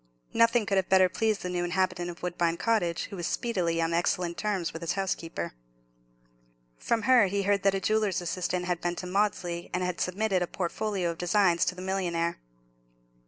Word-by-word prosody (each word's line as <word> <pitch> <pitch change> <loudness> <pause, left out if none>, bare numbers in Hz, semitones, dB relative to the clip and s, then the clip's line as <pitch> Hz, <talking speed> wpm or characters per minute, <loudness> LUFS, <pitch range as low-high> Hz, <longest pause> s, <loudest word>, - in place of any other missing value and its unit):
Nothing 230 -1 +4
could 200 -2 0
have 190 -1 +1
better 185 -1 +5
pleased 215 +1 0
the 180 - -3
new 175 -1 -1
inhabitant 180 0 0
of 170 0 -10
Woodbine 170 -1 0
Cottage, 190 -7 +1
who - - -5
was 175 -2 -3
speedily 180 -8 -1
on 165 0 0
excellent 170 0 0
terms 195 -5 -2
with 165 - -7
his 170 +1 -1
housekeeper. 165 - -3 1.3
From 230 -2 0
her 240 -3 +6
he 200 +1 -1
heard 200 0 +2
that 195 0 +3
a - - 0
jeweller's 215 -1 +1
assistant 180 +1 -2
had 180 -1 -1
been 175 0 -1
to 180 - -6
Maudesley, 180 -3 -1
and 180 - 0
had 180 -1 -2
submitted 190 0 0
a 175 - 0
portfolio 185 0 -2
of 165 - -10
designs 175 -1 +3
to 180 - -1
the 185 - -7
millionaire. 175 -3 -1
180 Hz, 190 wpm, -28 LUFS, 175-200 Hz, 1.3 s, her